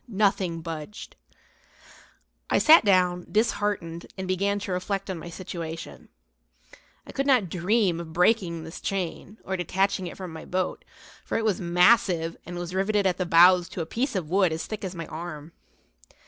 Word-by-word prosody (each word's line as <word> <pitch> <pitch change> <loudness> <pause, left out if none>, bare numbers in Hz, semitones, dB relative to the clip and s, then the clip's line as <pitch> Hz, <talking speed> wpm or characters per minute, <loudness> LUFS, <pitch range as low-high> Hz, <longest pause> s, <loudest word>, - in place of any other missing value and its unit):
Nothing 195 -6 0
budged. 165 +4 -7 1.3
I - - +3
sat 320 -3 +7
down, 180 -3 +2
disheartened, 205 -6 -1
and 190 -1 -4
began 200 +2 0
to 195 - -5
reflect 195 +2 -2
on 180 - -5
my 170 - -8
situation. 170 -2 -7 1.0
I - - -10
could 275 0 -2
not 245 -10 +3
dream 185 0 +1
of 165 -2 -7
breaking 175 -2 +1
this 160 +1 -9
chain, 195 +2 -4
or 190 - -2
detaching 190 +1 0
it - - -9
from 185 -4 -7
the 160 - -9
boat, 185 0 -2 0.4
for - - -2
it 225 - -1
was 205 -4 0
massive 175 -1 +3
and 175 0 -6
was 175 0 -5
riveted 200 +2 +1
at 180 -1 +1
the 185 - -1
bows 175 +1 +6
to 180 - -5
a - - -3
piece 245 - -2
of 180 -5 -2
wood 185 +1 +2
as 160 +1 -3
thick 215 -2 -6
as 190 -1 -5
my 165 -1 -5
arm. 160 -1 -7
185 Hz, 175 wpm, -26 LUFS, 170-200 Hz, 1.3 s, sat